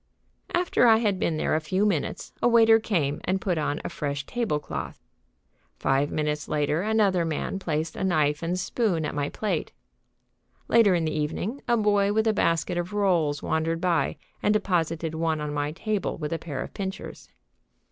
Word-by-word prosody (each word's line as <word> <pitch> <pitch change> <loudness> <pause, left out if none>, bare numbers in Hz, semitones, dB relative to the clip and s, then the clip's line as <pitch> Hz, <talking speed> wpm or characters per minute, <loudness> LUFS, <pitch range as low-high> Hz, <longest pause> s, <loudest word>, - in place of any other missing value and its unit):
After 350 -8 +3
I 225 -1 +7
had 205 -4 0
been 160 -3 0
there - - 0
a 155 - +3
few 185 +6 0
minutes 185 -8 -2
a - - +4
waiter 225 -1 +6
came 165 -10 -1
and 190 +1 0
put 180 -4 -1
on 145 0 -1
a - - -2
fresh 140 -1 -3
table 235 -11 -1
cloth. 150 - -6 0.8
Five 135 +2 +1
minutes 150 0 -2
later 150 +2 0
another 205 -4 +2
man 165 +4 -2
placed 160 -3 -2
a - - -3
knife 150 -5 +1
and 175 +2 -1
spoon 185 -4 0
at - - -3
my 145 -1 -1
plate. 215 - -2 0.9
Later 215 -5 +5
in 165 -2 0
the 155 - -1
evening 175 - -3
a 240 - +3
boy 205 -2 +3
with 220 +1 +2
a 220 - +3
basket 175 -2 +1
of 175 +3 -4
rolls 170 -8 +1
wandered 165 +1 0
by 170 -5 +1 0.2
and 210 +1 +2
deposited 165 -5 0
one 160 -1 0
on 150 -1 -3
my 145 0 -1
table 210 +4 -2
with 150 0 -3
a 165 - -2
pair 140 -6 -4
of - - -10
pincers. 190 -1 -6
170 Hz, 185 wpm, -26 LUFS, 150-205 Hz, 0.9 s, I